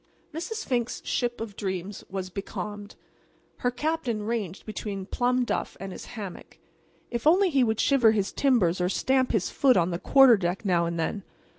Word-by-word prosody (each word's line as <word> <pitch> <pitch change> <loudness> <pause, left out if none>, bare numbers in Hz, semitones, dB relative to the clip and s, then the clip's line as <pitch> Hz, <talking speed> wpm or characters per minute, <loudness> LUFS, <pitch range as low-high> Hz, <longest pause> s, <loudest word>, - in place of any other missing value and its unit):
Mrs. 360 +8 -4
Fink's 240 -2 -1
ship 240 -1 -1
of 225 -3 -6
dreams 190 0 -4
was 185 -1 -5
becalmed. 205 +1 -6 0.6
Her 245 - 0
captain 250 -4 -2
ranged 210 -5 -3
between 205 -3 -5
plum 245 +4 +1
duff - - -3
and 195 +1 -6
his - - -8
hammock. 200 -4 -8 0.5
If 235 +4 -1
only 365 +3 +5
he 270 -3 +4
would 220 -2 0
shiver 265 -5 +4
his 205 -3 0
timbers 200 -11 +2
or 180 - +1
stamp 260 +5 +1
his 215 -6 0
foot 260 -6 +4
on 175 0 +2
the 170 - -3
quarter 270 -2 +6
deck 185 +3 -2
now 175 -3 +2
and 170 0 -3
then! 200 +5 -2
220 Hz, 175 wpm, -27 LUFS, 190-250 Hz, 0.6 s, quarter